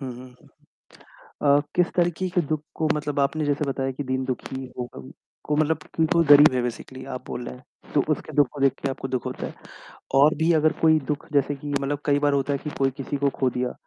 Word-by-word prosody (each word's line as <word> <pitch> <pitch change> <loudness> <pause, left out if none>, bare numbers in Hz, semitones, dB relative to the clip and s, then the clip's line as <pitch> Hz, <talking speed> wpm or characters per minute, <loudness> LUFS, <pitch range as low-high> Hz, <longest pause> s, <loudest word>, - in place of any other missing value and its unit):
हुँ, 135 - -5
हुँ, 125 +1 -10
हुँ, 125 - -17 0.9
हुँ। 145 0 +2
अ, - - +2 0.2
किस 180 -1 +4
तरीके 175 +1 +1
के 175 - +4
दुःख 155 0 -1
को 160 -1 0
मतलब 145 -1 -2
आपने 150 +3 +1
जैसे 145 +1 0
बताया 135 -1 -2
कि 145 - -5
दीन-दुखी 130 0 -3
होगा 120 - -6 0.4
को 150 - 0
मतलब 155 0 +2 0.3
कोई 170 -1 +4
गरीब 145 -1 +8
है 125 - +1
बेसिकली 125 +2 -6
आप - - -10
बोल 120 - -5
रहे - - -7
हैं, 125 - -21
तो 145 - +5
उसके 155 - -5
दुःख 145 -4 +5
को 145 - -8
देख 135 -1 +4
के 140 - 0
आपको 135 0 -5
दुःख 125 -4 -3
होता - - -4
है। - - -8 0.6
और 140 +3 +6
भी 165 +2 +3
अगर 155 0 +3
कोई 160 -1 +5
दुःख 150 -1 -3
जैसे 145 0 +2
कि, 145 +1 -8
मतलब 140 +1 -2
कई 145 -1 +3
बार 145 0 +2
होता 140 0 +1
है 140 - 0
कि 150 - -6
कोई 135 -1 +2
किसी 140 +1 -3
को 140 0 +1
खो 130 - +2
दिया, 125 0 -2
140 Hz, 240 wpm, -24 LUFS, 130-150 Hz, 0.9 s, गरीब